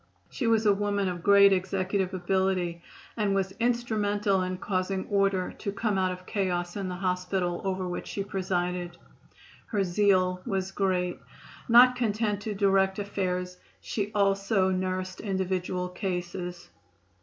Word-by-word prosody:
She 245 - -2
was 225 -1 +3
a 205 - +6
woman 200 -1 0
of 175 -2 -3
great 200 +1 +6
executive 190 0 -1
ability, 185 -2 0 0.3
and 205 -3 +1
was 190 -1 0
instrumental 210 -4 +1
in 185 0 -2
causing 190 0 -2
order 195 -2 +1
to 200 - -3
come 205 -1 -1
out 185 -1 +1
of 185 0 -8
chaos 175 -3 -2
in 195 -2 -3
the 180 - -4
hospital 180 -1 -1
over 190 -1 -2
which 175 - -5
she 200 - -3
presided. 180 -2 -2 0.7
Her 205 -3 0
zeal 185 -1 +2
was 195 -4 -2
great. 180 -3 0 0.5
Not 250 +2 +8
content 215 -3 0
to 210 0 -4
direct 195 -1 +2
affairs, 180 -3 -2 0.2
she 205 -1 -3
also 195 -1 +2
nursed 185 0 -2
individual 185 -2 -2
cases. 180 -1 -5
190 Hz, 140 wpm, -28 LUFS, 180-200 Hz, 0.7 s, Not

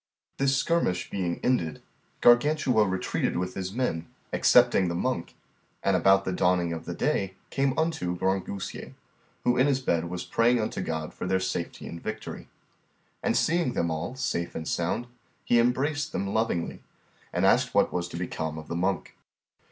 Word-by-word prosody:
This 135 0 +2
skirmish 135 - 0
being 90 -3 -2
ended, 85 -12 +1 0.4
Gargantua 120 -3 +4
retreated 95 0 -1
with 90 +1 -2
his 95 -1 -4
men, 95 -9 -2 0.3
excepting 95 - +5
the 85 - -2
monk, 105 -1 -2 0.5
and 100 - +3
about 95 +2 +4
the 95 - -1
dawning 90 -2 +2
of 80 - -6
the - - -4
day 95 - +1
they 95 - -19 0.2
came 135 -1 +1
unto 160 - 0
Grangousier, 95 +1 -3 0.5
who 125 0 +2
in 130 +3 +4
his 135 -2 +2
bed 85 -10 0
was 90 0 -4
praying 120 +1 +3
unto 110 -3 -2
God 80 -3 -3
for - - -5
their 95 0 +2
safety 95 -2 -3
and 85 - -7
victory. 110 0 -6 0.7
And - - +1
seeing 165 -6 +2
them 85 -1 0
all 80 +10 -3
safe 85 -10 -2
and 80 - -4
sound, 85 +8 -1 0.4
he 120 - +4
embraced 145 +5 +1
them 100 0 -2
lovingly, 110 -7 -1 0.5
and - - +1
asked - - +3
what - - +3
was 90 -1 -2
become 80 -3 -4
of 80 - -9
the - - -3
monk. 95 +2 -1
95 Hz, 165 wpm, -27 LUFS, 85-125 Hz, 0.7 s, excepting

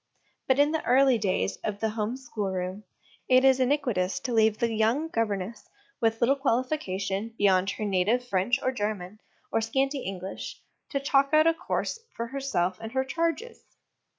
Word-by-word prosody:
But 260 - +3
in 290 +1 +4
the 320 - -1
early 260 -1 +4
days 95 - 0
of 205 -1 -4
the 220 - 0
home 220 +3 -2
schoolroom, 195 -5 -4 0.4
it 255 +1 +6
is 265 -1 +5
iniquitous 245 -9 +1
to 250 - -3
leave 220 -1 +3
the 235 -1 0
young 230 +9 +1
gover 220 -3 0
ness, 205 +4 -8 0.3
with 225 -2 +1
little 255 +4 +4
qualification 225 -6 -1
beyond 190 -1 +3
her 215 - -3
native 210 +6 +1
French 215 +5 +1
or 260 - +2
German, 210 -4 -4 0.3
or 225 - +1
scanty 270 +5 0
English, 190 -3 -6 0.3
to 280 - -1
chalk 275 +1 +2
out 310 0 +6
a 330 - +5
course 395 +7 -3 0.2
for 235 - -3
herself 235 -9 -1
and 225 +1 -7
her 265 0 +1
charges. 335 - -2
230 Hz, 170 wpm, -27 LUFS, 200-270 Hz, 0.4 s, it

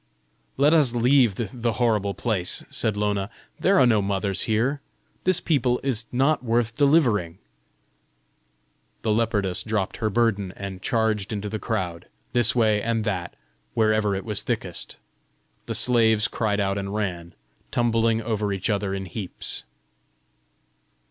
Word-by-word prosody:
"Let 145 +3 +4
us 140 -7 +4
leave 120 -3 +4
the 115 +2 -2
horrible 105 -4 +1
place," 95 -4 0
said 110 -2 -1
Lona; 105 -1 -1 0.3
"there 195 - +3
are 130 - +6
no 110 -4 +3
mothers 100 0 0
here! 125 +7 +1 0.4
This 185 -1 +4
people 125 -8 +1
is 120 -4 -1
not 135 +3 +2
worth 115 -1 0
delivering." 120 - +2 1.7
The 110 - +1
leopardess 105 -4 0
dropped 105 -4 -2
her 110 - 0
burden, 105 -4 0
and 95 -2 -7
charged 110 -3 0
into 105 -1 -3
the 110 +1 -4
crowd, 90 -8 -3 0.3
this 120 -2 +3
way 110 -3 +3
and 115 0 -1
that, 95 -5 -3 0.4
wherever 110 -2 +2
it 95 - -5
was 105 -3 +2
thickest. - - -4 0.7
The - - -2
slaves 115 -2 +3
cried 105 -5 -1
out 100 0 0
and 100 +1 -4
ran, 85 -5 -3 0.3
tumbling 115 -1 +1
over 105 -2 -1
each 100 +2 -1
other 100 -1 -1
in 95 0 -4
heaps. 95 +1 -6
110 Hz, 140 wpm, -24 LUFS, 100-120 Hz, 1.7 s, are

